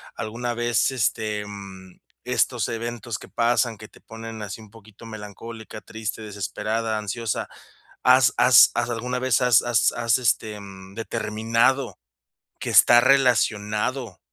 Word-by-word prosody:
alguna 120 +2 -4
vez, 120 -1 +1
este, 110 -3 -1
em, 100 -3 -11 0.2
estos - - 0
eventos 115 -1 -4
que - - -12
pasan, 120 -1 +1
que 110 +1 -11
te - - -19
ponen 115 0 -9
así 105 +2 -7
un 105 -2 -15
poquito 110 0 -16
melancólica, 110 +1 -9
triste, 110 0 -6
desesperada, 110 +2 -3
ansiosa, 105 +1 -3 0.5
¿has 125 -2 +5
has 125 -4 +7
has 120 0 0
alguna 125 +2 -3
vez 130 -3 +2
has 125 -2 +5
has 120 -3 +2
has, 115 -1 +1
este, 110 -3 -1
mm, 95 0 -12
determinado 115 +3 0 0.6
que - - -4
está 120 0 +7
relacionado 115 -3 +1
115 Hz, 135 wpm, -23 LUFS, 105-120 Hz, 0.6 s, has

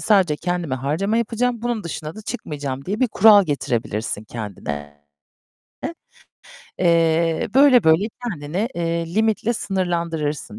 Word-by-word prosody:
sadece 190 -8 +3
kendime 175 -4 -2
harcama 155 - -1
yapacağım. 235 +1 -1
Bunun 235 -4 -2
dışına 160 -1 -5
da 215 - -10
çıkmayacağım 145 - -5
diye 205 - -3
bir 255 - +3
kural 210 -1 +6
getirebilirsin 115 - -2
kendine. 75 -10 -7 1.8
Eee, 165 -2 +2
böyle 270 -2 +6
böyle 160 +5 +4 0.2
kendini, 180 0 -3
eee, 170 0 -2
limitle 220 +1 +1
sınırlandırırsın, 170 - -2
170 Hz, 115 wpm, -21 LUFS, 145-215 Hz, 1.8 s, kural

